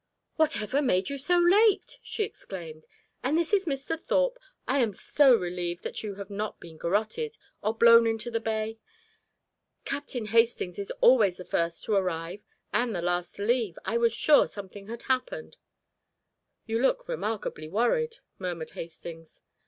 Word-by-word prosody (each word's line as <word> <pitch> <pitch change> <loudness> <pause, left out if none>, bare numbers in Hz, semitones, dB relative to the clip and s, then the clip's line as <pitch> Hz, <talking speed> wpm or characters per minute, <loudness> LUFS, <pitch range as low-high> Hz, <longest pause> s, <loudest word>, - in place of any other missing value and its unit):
"Whatever 290 -4 +2
made 195 -6 +1
you 280 - -4
so 355 +6 +2
late?" 420 +7 +4
she 430 - -3
exclaimed. 165 - -8 0.4
"And 280 +5 +2
this 340 +4 0
is 390 -3 +3
Mr. 280 +3 -2
Thorpe? - - +1 0.3
I 275 - +2
am 230 -5 +2
so 275 +2 +5
relieved 175 -2 -3
that - - -4
you 205 -3 -5
have 200 0 -8
not 210 +1 -4
been 165 -2 -12
garotted, 220 - -1 0.2
or 215 +2 -1
blown 230 0 +7
into 225 +1 -2
the 230 - 0
bay. 220 0 -2 1.1
Captain 270 -4 -4
Hastings 225 -4 +2
is 200 - -4
always 215 -8 +5
the 180 - -9
first 170 0 -1
to 215 - -1
arrive 180 0 -1 0.3
and 240 -3 +1
the 175 - -2
last 175 0 -1
to 200 - -4
leave 225 -5 +1
I 230 - 0
was 235 0 +3
sure 290 +6 +5
something 200 0 -9
had 235 +1 -7
happened." 265 - -2 1.1
"You 225 +1 -1
look - - +1
remarkably 220 - -3
worried," 455 - +1 0.2
murmured 175 -4 -4
Hastings. 165 -1 -10
225 Hz, 160 wpm, -28 LUFS, 185-275 Hz, 1.1 s, blown